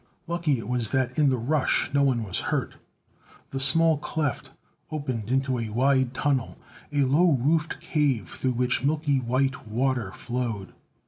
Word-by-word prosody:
Lucky 170 -5 0
it 115 -3 -7
was 120 -3 +1
that 130 +1 0
in 145 -2 +5
the 130 - +1
rush 135 +5 +1
no 140 - +3
one 130 -4 +2
was 95 -4 -3
hurt. - - -1 0.8
The 135 - -3
small 160 +3 +3
cleft 150 -4 -3 0.4
opened 130 -8 -3
into 130 -1 +1
a 115 -2 -3
wide 130 +2 +2
tunnel, 135 -4 0 0.3
a 145 -1 +1
low 155 +6 +4
roofed 150 +5 +1
cave 135 - 0
through 130 -1 -1
which 125 +1 +1
milky 145 -1 +1
white 130 0 -1
water 120 -2 0
flowed. 120 -5 -4
130 Hz, 155 wpm, -26 LUFS, 120-145 Hz, 0.8 s, in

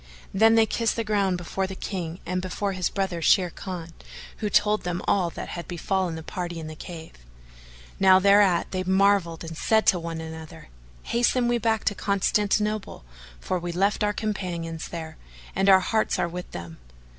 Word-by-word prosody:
Then 225 +3 +5
they 225 -1 +6
kissed 230 0 0
the 230 - -1
ground 200 -4 +1
before 190 +2 -3
the 190 - -7
King 180 -3 -5
and 185 0 -2
before 195 +2 -2
his 185 -2 -1
brother 190 -4 -2
Sharrkan, 175 0 +1 0.5
who 210 - -2
told 210 +1 +3
them 175 0 -3
all 185 -4 +2
that - - -7
had 170 - -6
befallen 180 0 -1
the 160 - -7
party 175 0 -5
in 160 - -6
the 155 0 -7
cave. 160 0 -9 0.9
Now 190 -1 +7
thereat 200 -2 +4
they 185 - -1
marvelled 190 -3 +2
and 165 0 -7
said 220 +6 +2
to 180 - +4
one 165 -1 -5
another, 160 - -9 0.3
"Hasten 240 +1 +1
we 240 0 +1
back 225 -2 +1
to 205 - +1
Constantinople, 210 - 0 0.3
for 185 - -2
we 175 0 -4
left 195 +5 +1
our 210 - +2
companions 175 -7 -4
there, 160 -2 -7 0.4
and 195 +1 +3
our 190 -1 +7
hearts 220 +4 0
are - - +1
with 180 +1 -7
them." 85 -3 -8
185 Hz, 180 wpm, -25 LUFS, 170-205 Hz, 0.9 s, Now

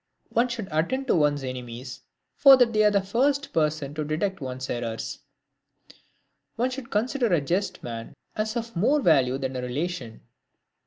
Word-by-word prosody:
One 235 +2 +2
should 235 -5 -5
attend 170 +13 0
to - - +4
one's 145 -3 +2
enemies, 125 0 -7 0.3
for 275 -2 +8
they 230 -4 +3
are 210 - +6
the 200 -2 +1
first 270 +8 0
persons 150 -2 0
to 155 - -2
detect 165 +5 -2
one's 130 -1 -5
errors. 115 -2 -4 1.4
One 250 +3 0
should 255 -2 -7
consider 240 +4 0
a 170 - +4
just 175 +8 -2
man 115 -1 -7 0.2
as 215 +1 -2
of 230 -1 -5
more 250 - +3
value 135 - +3
than 135 -1 -4
a 125 - -2
relation. 125 -2 -4
165 Hz, 160 wpm, -26 LUFS, -, 1.4 s, for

